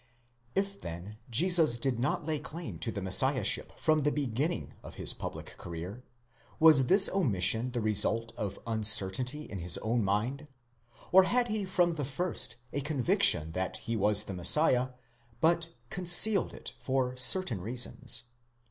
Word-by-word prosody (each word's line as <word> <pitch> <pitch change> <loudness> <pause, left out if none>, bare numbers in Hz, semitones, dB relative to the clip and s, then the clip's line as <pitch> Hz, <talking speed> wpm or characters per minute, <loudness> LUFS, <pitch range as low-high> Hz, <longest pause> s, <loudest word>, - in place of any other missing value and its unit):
If 195 0 -3
then 90 +6 -10
Jesus 160 0 +4
did 125 -1 -3
not 130 +4 -3
lay 155 -2 -3
claim 150 - -9
to 115 - -4
the 100 -2 -7
Messiahship 125 +4 +3
from 155 -1 0
the 145 +1 -1
beginning 145 +4 -4
of - - -13
his - - 0
public - - -9
career, 90 +8 -9 0.6
was 155 -5 +5
this 195 +1 +6
omission 115 - 0
the 120 -1 -5
result 110 +2 +1
of 100 -2 -6
uncertainty 110 +5 +2
in 100 -9 -9
his 85 +1 -1
own 115 +1 -3
mind; 115 +10 -3 0.6
or 190 +1 +5
had 245 +3 -1
he 215 -2 -3
from 180 -2 -1
the 150 -3 -5
first 135 -3 -2 0.2
a 140 - -3
conviction 125 - +1
that 95 +2 -4
he 115 - -6
was 105 0 +1
the 100 - -9
Messiah, 125 - +4 0.5
but 165 +2 0 0.2
concealed 185 +3 +5
it - - -10
for 130 0 -3
certain 130 - +2
reasons? 120 +2 -1
125 Hz, 150 wpm, -28 LUFS, 105-160 Hz, 0.6 s, this